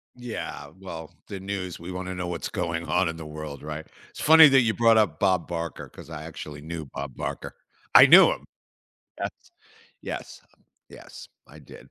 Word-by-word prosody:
Yeah, 120 Hz, -2 st, -7 dB
well, 80 Hz, -4 st, -8 dB, 0.2 s
the 95 Hz, -, -7 dB
news, 95 Hz, -2 st, -5 dB
we 85 Hz, +2 st, -8 dB
wanna 95 Hz, 0 st, -5 dB
know 90 Hz, 0 st, -4 dB
what's 85 Hz, -4 st, -4 dB
going 85 Hz, 0 st, -3 dB
on 90 Hz, +1 st, +2 dB
in 80 Hz, -, -3 dB
the 80 Hz, -, -8 dB
world, 75 Hz, -2 st, -8 dB
right? 75 Hz, +1 st, -6 dB, 0.2 s
It's -, -, -13 dB
funny 160 Hz, 0 st, +9 dB
that 135 Hz, -1 st, +5 dB
you 115 Hz, -2 st, +1 dB
brought 115 Hz, -1 st, +4 dB
up 90 Hz, -8 st, +2 dB
Bob 95 Hz, -4 st, +1 dB
Barker, 85 Hz, -2 st, -5 dB
'cause -, -, -13 dB
I 75 Hz, -2 st, -7 dB
actually 75 Hz, -2 st, -9 dB
knew 80 Hz, 0 st, -6 dB
Bob 70 Hz, -1 st, -7 dB
Barker. -, -, -5 dB, 0.4 s
I -, -, +11 dB
knew -, -, +8 dB
him. -, -, -6 dB, 0.7 s
Yes. -, -, -7 dB, 0.5 s
Yes, -, -, -7 dB, 0.5 s
yes, -, -, -13 dB, 0.2 s
I 80 Hz, -, -15 dB
did. 70 Hz, -, -15 dB
85 Hz, 180 wpm, -25 LUFS, 80-95 Hz, 0.7 s, I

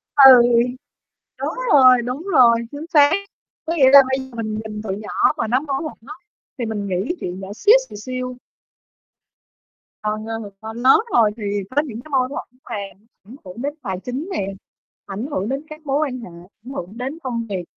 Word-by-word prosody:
Ừ, 270 Hz, -2 st, +10 dB, 1.1 s
đúng -, -, -2 dB, 0.2 s
rồi, 255 Hz, -3 st, +7 dB
đúng 250 Hz, +5 st, -4 dB
rồi, 240 Hz, -5 st, +7 dB, 0.2 s
chính 290 Hz, +3 st, -7 dB
xác, 290 Hz, -1 st, +6 dB, 0.5 s
có 330 Hz, -, -1 dB
nghĩa 265 Hz, -4 st, +6 dB
là 280 Hz, -, +10 dB
bây 265 Hz, 0 st, 0 dB
giờ -, -, -16 dB
mình 220 Hz, -2 st, -4 dB
nhìn 210 Hz, -1 st, -6 dB
tụi 195 Hz, -3 st, -4 dB
nhỏ 210 Hz, 0 st, +1 dB
mà -, -, -1 dB
nó 250 Hz, +4 st, +1 dB
mâu 275 Hz, -3 st, -3 dB
thuẫn 310 Hz, -, -6 dB
á 300 Hz, -, -8 dB, 0.4 s
thì 240 Hz, -, -2 dB
mình 210 Hz, -2 st, -3 dB
nghĩ 190 Hz, -, -1 dB
chuyện 180 Hz, +1 st, -5 dB
nhỏ 190 Hz, -, -8 dB
xíu 425 Hz, -, +5 dB
xìu -, -, -10 dB
xiu. 255 Hz, +3 st, -5 dB, 1.7 s
Còn, 215 Hz, 0 st, -3 dB
ờ, 225 Hz, -2 st, -5 dB
còn 220 Hz, +1 st, -7 dB
lớn 255 Hz, -, +5 dB
rồi 220 Hz, -3 st, +4 dB
thì 220 Hz, -, -7 dB, 0.3 s
có 290 Hz, -, +4 dB
những 240 Hz, -7 st, -7 dB
cái 310 Hz, -, -15 dB
mâu 260 Hz, -2 st, +2 dB
thuẫn 255 Hz, -2 st, -8 dB
mà 235 Hz, -, -3 dB, 0.5 s
ảnh 225 Hz, +7 st, -13 dB
hưởng 185 Hz, +5 st, -9 dB
đến 285 Hz, +2 st, -2 dB
tài 185 Hz, -2 st, -4 dB
chính 270 Hz, +9 st, -5 dB
nè, 260 Hz, -, -2 dB, 0.6 s
ảnh 200 Hz, +4 st, -5 dB
hưởng 200 Hz, -2 st, -2 dB
đến 275 Hz, +2 st, -3 dB
các 305 Hz, 0 st, -11 dB
mối 275 Hz, 0 st, 0 dB
quan 255 Hz, -2 st, -6 dB
hệ, 230 Hz, -, -9 dB, 0.3 s
ảnh 250 Hz, -, -9 dB
hưởng 195 Hz, -1 st, -7 dB
đến 265 Hz, +6 st, -5 dB
công 235 Hz, -3 st, -3 dB
việc, 190 Hz, -3 st, -3 dB
250 Hz, 200 wpm, -20 LUFS, 215-275 Hz, 1.7 s, Ừ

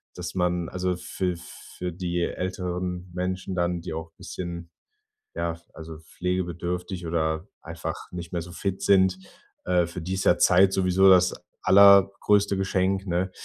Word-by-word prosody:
dass 90 Hz, +1 st, -6 dB
man, 90 Hz, -2 st, 0 dB
also, 90 Hz, 0 st, -2 dB
für 90 Hz, 0 st, -3 dB
für 90 Hz, +1 st, -8 dB
die 85 Hz, 0 st, -3 dB
älteren 90 Hz, 0 st, -3 dB
Menschen 95 Hz, +1 st, -3 dB
dann, 85 Hz, -1 st, 0 dB
die 85 Hz, -, -6 dB
auch 80 Hz, 0 st, -6 dB
bisschen, 85 Hz, -1 st, -7 dB, 0.7 s
ja, 85 Hz, -1 st, -2 dB, 0.2 s
also, 80 Hz, 0 st, -9 dB
pflegebedürftig 90 Hz, +1 st, -4 dB
oder 80 Hz, +2 st, -1 dB
einfach 85 Hz, 0 st, -5 dB, 0.2 s
nicht 85 Hz, -1 st, -7 dB
mehr 85 Hz, -, -1 dB
so 85 Hz, +1 st, -11 dB
fit 95 Hz, +2 st, -3 dB
sind, 95 Hz, -1 st, +4 dB, 0.5 s
äh, 90 Hz, -1 st, +2 dB
für 85 Hz, +1 st, -7 dB
die 90 Hz, +3 st, -4 dB
ist 95 Hz, -, -2 dB
ja 85 Hz, -, +5 dB
Zeit 95 Hz, +2 st, +5 dB
sowieso 95 Hz, 0 st, +4 dB
das 90 Hz, -1 st, +5 dB, 0.3 s
allergrößte 100 Hz, +1 st, +5 dB
Geschenk, 95 Hz, 0 st, 0 dB
ne? 90 Hz, +1 st, -1 dB
90 Hz, 145 wpm, -25 LUFS, 85-95 Hz, 0.7 s, ja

